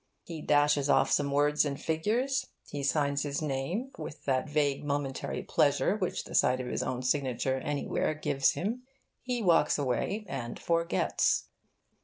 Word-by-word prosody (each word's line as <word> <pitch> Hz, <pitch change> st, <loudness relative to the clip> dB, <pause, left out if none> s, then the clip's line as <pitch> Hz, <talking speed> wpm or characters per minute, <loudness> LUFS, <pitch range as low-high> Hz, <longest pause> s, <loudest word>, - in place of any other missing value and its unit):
He 165 Hz, -3 st, -7 dB
dashes 145 Hz, -1 st, +3 dB
off -, -, +4 dB
some 145 Hz, -1 st, +2 dB
words 145 Hz, +1 st, +3 dB
and 140 Hz, -2 st, -3 dB
figures, 245 Hz, +12 st, 0 dB, 0.2 s
he 145 Hz, -, -5 dB
signs 140 Hz, 0 st, +1 dB
his 140 Hz, -1 st, -2 dB
name 155 Hz, -, -2 dB
(with 150 Hz, -, -8 dB
that 135 Hz, +1 st, 0 dB
vague 145 Hz, -2 st, +1 dB
momentary 140 Hz, -2 st, -2 dB
pleasure -, -, +2 dB
which -, -, -2 dB
the -, -, -11 dB
sight 130 Hz, +1 st, +3 dB
of 130 Hz, -, -3 dB
his 125 Hz, -, -2 dB
own 130 Hz, 0 st, -3 dB
signature 130 Hz, -1 st, 0 dB
anywhere 145 Hz, +2 st, -1 dB
gives 135 Hz, -3 st, +1 dB
him), 225 Hz, +7 st, -3 dB, 0.4 s
he 245 Hz, -2 st, -2 dB
walks 170 Hz, -4 st, +4 dB
away 145 Hz, -, -1 dB
and 120 Hz, -6 st, -5 dB
forgets. 170 Hz, 0 st, +1 dB
145 Hz, 155 wpm, -30 LUFS, 135-165 Hz, 0.4 s, off